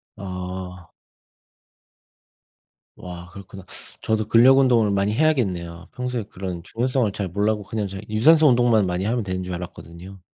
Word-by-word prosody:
아. 90 -2 -7 2.1
와 90 -1 -9
그렇구나. 95 0 -11 0.4
저도 110 -1 -1
근력운동을 120 -2 +5
많이 100 +1 +1
해야겠네요. 95 - 0
평소에 125 -3 -3
그런 90 -4 -6
중요성을 120 +1 -1
잘 100 -3 -4
몰라고 105 +3 0
그냥 105 +1 -3
잘 95 +1 -7
유산소 155 +9 +5
운동만 120 -4 +3
많이 90 +2 -2
하면 115 0 0
되는 95 -1 -3
줄 90 - -5
알았거든요. 90 +1 -9
100 Hz, 315 characters per minute, -23 LUFS, 90-115 Hz, 2.1 s, 근력운동을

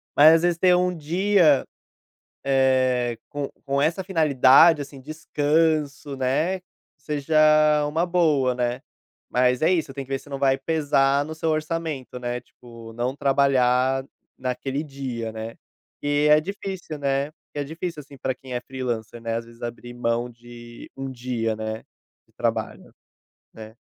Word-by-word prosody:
mas, 155 +3 +8
às 165 - +2
vezes, 175 -1 +1
tem 180 -1 +5
um 180 0 +1
dia, 170 -1 +3 0.8
eh, 130 -3 +2
com 145 -1 -4
com 140 0 0
essa 165 +6 +1
finalidade, 160 -2 +5
assim, 140 -1 -9
descanso, 150 0 0
né, 150 +8 0 0.4
seja 150 +1 -3 0.5
uma 160 +4 0
boa, 155 -8 +2
né. 125 0 -1 0.5
Mas 125 +1 +2
é 175 - +4
isso, 160 -5 -1
tem 135 0 -6
que 130 - -24
ver 135 - -1
se 145 - -17
não 140 - -4
vai 135 -1 +3
pesar 140 -2 +1
no 160 - -6
seu 160 0 -2
orçamento, 155 -5 -3
né, 120 0 -3
tipo 115 -2 -14
não 120 +3 -2
trabalhar 135 -2 +2 0.3
naquele 135 +3 -3
dia, 130 -6 -5
né. 110 +1 -7 0.5
Que 145 +1 +1
é 150 0 +7
difícil, 185 -3 -6
né, 140 +1 0 0.2
que - - -9
é - - 0
difícil, 160 +2 -5
assim, 140 0 -15
pra 130 0 -2
quem 130 0 -10
é 125 - -2
freelancer, 120 -4 -5
né, 115 0 -2
às 115 0 -3
vezes, 115 0 -17
abrir 120 +1 -7
mão 120 0 -1
de 120 0 -13
um 135 0 -5
dia, 120 -3 -2
né, 110 0 -4 0.5
de - - -33
trabalho, - - -3 0.6
né. 110 0 -11
135 Hz, 155 wpm, -24 LUFS, 125-155 Hz, 0.8 s, mas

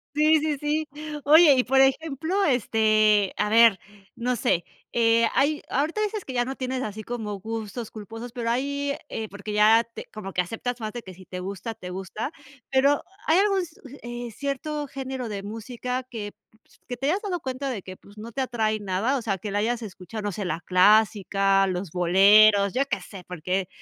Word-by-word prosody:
Sí, 310 +1 +4
sí, 300 -2 -1
sí. 300 +1 -1 0.4
Oye, 310 0 +7
y, 255 -1 +2
por 265 +1 +3
ejemplo, 320 +7 +1
este, 215 -5 +3
a 210 - +1
ver, 225 -2 +6 0.4
no 245 +1 -1
sé, 175 -4 +1 0.3
eh, 230 0 +4
hay 295 +2 +2
ahorita 315 +10 0
dices 425 -1 -3
que 260 - -6
ya 245 0 +2
no 265 - -4
tienes 260 0 -3
así 215 +1 -5
como 215 -3 -5
gustos 225 +2 -5
culposos, 225 +3 -8
pero 235 -2 -2
hay 280 +3 -1 0.2
eh, 220 -1 -5
porque 205 +1 -6
ya 220 +2 +5
te - - -8
como 195 -3 -7
que 180 - +2
aceptas 235 +6 -5
más 215 -1 -4
de 240 - -5
que 190 -3 -11
si 185 +1 -14
te 180 0 -7
gusta, 200 +4 -5
te 205 -5 -10
gusta, 190 +8 -5 0.4
pero 275 +2 +3 0.2
¿hay 320 +3 +4
algún 395 -1 +3
s 320 -3 -11
uh, - - -11
eh, 240 0 -6
cierto 285 +2 -3
género 265 -3 -5
de 200 -1 -4
música 240 +4 -4
que, 225 -5 -7 0.2
pues, 220 0 -27
que 245 -1 -6
te 270 - -2
hayas 385 +7 +1
dado 365 -4 -3
cuenta 265 0 -4
de 220 -6 -4
que, 185 0 -10
pues, 205 +1 -18
no 230 +2 -8
te 265 - -1
atrae 220 -4 -1
nada? 200 +7 0
O 255 - -3
sea, 200 -4 -1
que 210 - -5
la 205 +1 0
hayas 240 +2 0
escuchado, 210 0 -8
no 205 - 0
sé, 200 +2 -4
la 175 -1 -2
clásica, 195 0 +3
los 180 -1 -3
boleros, 200 +4 +5
¿yo 265 - +2
qué 235 - -3
sé?, 180 0 -11
porque, 180 +2 -2
230 Hz, 205 wpm, -25 LUFS, 205-270 Hz, 0.4 s, Oye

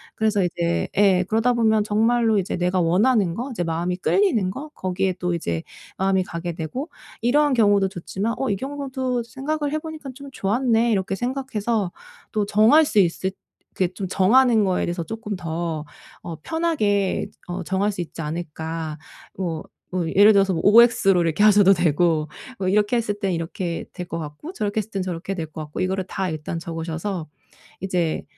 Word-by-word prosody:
그래서 215 -3 +1
이제 170 -1 -1
예 195 -2 +5
그러다보면 225 -1 +3
정말로 225 +1 +2
이제 185 - -2
내가 180 +1 +1
원하는 190 +2 +3
것, 250 +6 -4
이제 200 -8 -2
마음이 170 +2 -1
끌리는 230 - +2
거 290 +9 -7
거기에 185 0 -1
또 180 -1 -1
이제 85 - -3 0.3
마음이 190 0 +2
가게 175 -1 -5
되고 175 - -5 0.3
'이러한 285 +5 +3
경우도 205 -5 +4
좋지만 195 +5 -3
어 270 - 0
이 200 - +1
경우도 265 -2 -3
생각을 285 +5 -3
해 310 - 0
보니까 310 -3 -8
좀 280 +1 -10
좋았네?' 235 +1 +1
이렇게 195 -2 0
생각해서 235 -5 -2 0.4
또 210 -2 +1
정할 220 +10 +5
수 215 - +2
있을 190 +1 +1 0.5
이렇게 185 -1 0
좀 190 - -4
정하는 220 +3 +4
거에 185 -1 +1
대해서 175 0 -3
쪼끔 220 +2 -5
더 165 -2 -3 0.4
어 170 - -6
편하게 215 - 0 0.2
어 180 +1 -4
정할 195 +3 0
수 190 - -9
있지 165 -1 -7
않을까. 160 0 -5 0.4
뭐 170 -4 -3 0.3
뭐 180 -3 0
예를 205 +5 +7
들어서 195 -1 +3
뭐 160 - -1
오엑스로 210 -4 +6
이렇게 165 +4 +1
하셔도 205 -2 +7
되고, 165 -2 +1 0.3
뭐 190 - -1
이렇게 210 +4 +2
했을 210 -3 -2
땐 195 -2 0
이렇게 165 +1 -3
될 180 -2 -6
것 165 - -4
같고 155 - -8
저렇게 210 - -3
했을 215 0 -4
땐 195 - -2
저렇게 185 +1 -4
될 165 -3 -4
것 155 - -10
같고 150 0 -6
이거를 190 0 -1
다 190 -1 -2
일단 155 +1 -4
적으셔서 165 +1 -4 0.5
이제 175 -4 -1
195 Hz, 355 characters per minute, -23 LUFS, 175-230 Hz, 0.5 s, 예를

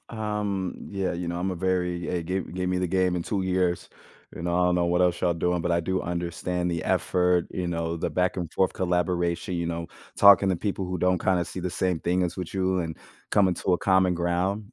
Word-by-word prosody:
Um, 105 -4 -2 0.2
yeah, 95 -2 -1
you 85 0 -4
know, 85 0 -3
I'm 95 +2 -1
a 90 - -2
very 90 -1 -1
eh, 90 -2 -1
gave 90 +2 -3
gave 90 0 -1
me 90 - 0
the 90 - 0
game 90 0 +1
in 85 - -2
2 100 0 -2
years, 90 -1 0 0.5
you 85 - -7
know? 85 0 -1
I 90 - +3
don't 90 - +2
know 85 -1 +2
what 90 +1 +2
else 90 -1 +1
y'all 90 -2 +2
doing, 90 +1 0
but 90 - -1
I 85 0 +2
do 95 +2 -1
understand 90 +1 -2
the 85 -1 -2
effort, 90 -1 +1
you 90 - -3
know, 85 -1 -2
the - - -1
back 90 0 0
and 85 -3 -4
forth 95 - +2
collaboration, 90 -1 -1
you 85 -1 -1
know, 85 0 -3 0.3
talking 100 -1 +7
to 95 - +1
people 95 0 -2
who 90 0 -3
don't 90 +1 +1
kinda 90 -2 +2
see 90 - -7
the 90 0 -3
same 90 -2 -1
thing 90 +1 +1
as 90 +1 -2
with 90 0 -5
you, 95 -1 +1
and 80 -2 -4 0.3
coming 95 -3 +3
to 90 - +1
a - - -1
common 95 -2 +3
ground, 90 +4 -1
90 Hz, 240 wpm, -26 LUFS, 85-95 Hz, 0.5 s, talking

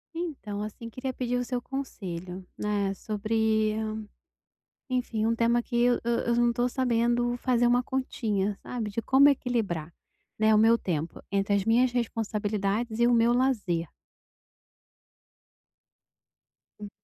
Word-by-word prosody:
Então, 275 -12 -4
assim, 215 +2 -6
queria 260 +3 -4
pedir 250 -1 -2
o 245 - 0
seu 250 0 -2
conselho, 185 -9 -6
né, 205 -2 -1
sobre, 215 +1 0 1.2
enfim, 240 -4 -1
um 230 +1 +2
tema 235 +1 +2
que 240 - -6
eu 245 0 +3
eu 235 0 0
não 240 0 +3
tô 245 +1 0
sabendo 240 -1 +1
fazer 245 -1 +2
uma 245 +1 +4
continha, 220 -6 -2
sabe, 225 -4 -4
de 230 - -2
como 270 +4 +6
equilibrar, 220 - -1 0.5
né, 220 0 +4
o 210 - +5
meu 225 +2 +5
tempo 165 -6 -4
entre 200 0 +1
as 200 -1 0
minhas 240 +3 +3
responsabilidades 220 -1 -2
e 235 - +5
o 245 - +4
meu 235 0 +4
lazer. 210 - 0 2.9
Hum. 205 - -7
230 Hz, 135 wpm, -27 LUFS, 210-245 Hz, 2.9 s, como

